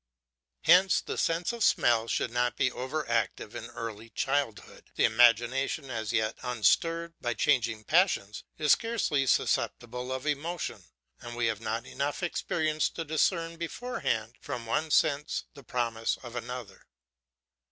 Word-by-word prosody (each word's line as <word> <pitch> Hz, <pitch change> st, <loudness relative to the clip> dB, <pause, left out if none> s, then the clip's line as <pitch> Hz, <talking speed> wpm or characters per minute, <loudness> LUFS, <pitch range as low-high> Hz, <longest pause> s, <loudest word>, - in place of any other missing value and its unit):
Hence 180 Hz, +3 st, +6 dB
the -, -, -5 dB
sense 170 Hz, +6 st, 0 dB
of 235 Hz, -2 st, -2 dB
smell 115 Hz, -, +3 dB
should 115 Hz, -, -1 dB
not 120 Hz, 0 st, 0 dB
be 130 Hz, -, +2 dB
over 140 Hz, +6 st, -4 dB
active 115 Hz, -4 st, -1 dB
in -, -, -6 dB
early 115 Hz, -1 st, -7 dB
childhood; 135 Hz, -4 st, -2 dB
the -, -, +1 dB
imagination, 120 Hz, +5 st, +3 dB
as 110 Hz, -3 st, -3 dB
yet 110 Hz, -1 st, 0 dB
unstirred 165 Hz, -, +1 dB
by 120 Hz, -2 st, -1 dB
changing 115 Hz, -6 st, +1 dB
passions, 155 Hz, -, +2 dB
is 150 Hz, -2 st, +3 dB
scarcely 200 Hz, -, +2 dB
susceptible 125 Hz, +1 st, 0 dB
of 130 Hz, +1 st, -3 dB
emotion, 155 Hz, +4 st, -3 dB, 0.3 s
and 120 Hz, 0 st, -8 dB
we 120 Hz, -1 st, 0 dB
have 110 Hz, -1 st, -1 dB
not 115 Hz, +2 st, -3 dB
enough 145 Hz, +7 st, -3 dB
experience 155 Hz, -2 st, 0 dB
to 165 Hz, -, -5 dB
discern 165 Hz, +2 st, 0 dB
beforehand 165 Hz, -, -3 dB
from 120 Hz, -2 st, -5 dB
one 155 Hz, +8 st, 0 dB
sense 150 Hz, 0 st, +2 dB
the 140 Hz, -, -12 dB
promise 115 Hz, -2 st, -1 dB
of 120 Hz, -1 st, -9 dB
another. 120 Hz, -4 st, -7 dB
125 Hz, 140 wpm, -29 LUFS, 115-155 Hz, 0.3 s, Hence